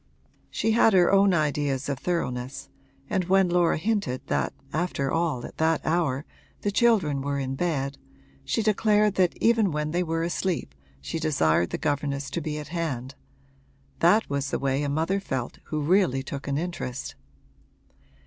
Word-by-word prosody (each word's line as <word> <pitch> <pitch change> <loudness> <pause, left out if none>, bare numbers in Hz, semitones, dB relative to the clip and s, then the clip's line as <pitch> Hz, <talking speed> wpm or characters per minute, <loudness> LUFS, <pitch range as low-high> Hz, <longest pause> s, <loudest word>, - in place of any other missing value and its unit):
She 225 - 0
had 225 -1 +5
her 180 -2 +5
own 195 0 +5
ideas 145 -4 0
of 140 -2 -2
thoroughness 130 -8 -3 0.4
and 185 - 0
when 190 0 +3
Laura 175 -1 +3
hinted 195 - -1
that - - 0 0.2
after 155 -4 -1
all 165 -7 0
at - - -11
that 160 0 +1
hour 155 -4 0 0.4
the 205 - 0
children 195 - +3
were 140 0 -2
in 135 -1 -2
bed 140 -3 -2 0.4
she 225 - -1
declared 210 -1 +3
that 185 -3 +1
even 225 -5 +3
when 150 0 -2
they 175 +2 +1
were 165 -1 -1
asleep 170 - -2 0.3
she 115 - -4
desired 85 - +2
the - - -3
governess 140 -2 -2
to 170 - -2
be 150 0 -3
at 150 -1 -7
hand 140 -7 -3 0.9
that 220 +2 +4
was 140 0 -2
the - - -1
way 135 0 0
a 145 - -1
mother 160 +7 0
felt 130 -10 -4
who 155 - -3
really 150 -4 +2
took 140 +1 -6
an 140 0 0
interest. 155 -6 -4
155 Hz, 165 wpm, -26 LUFS, 140-180 Hz, 0.9 s, had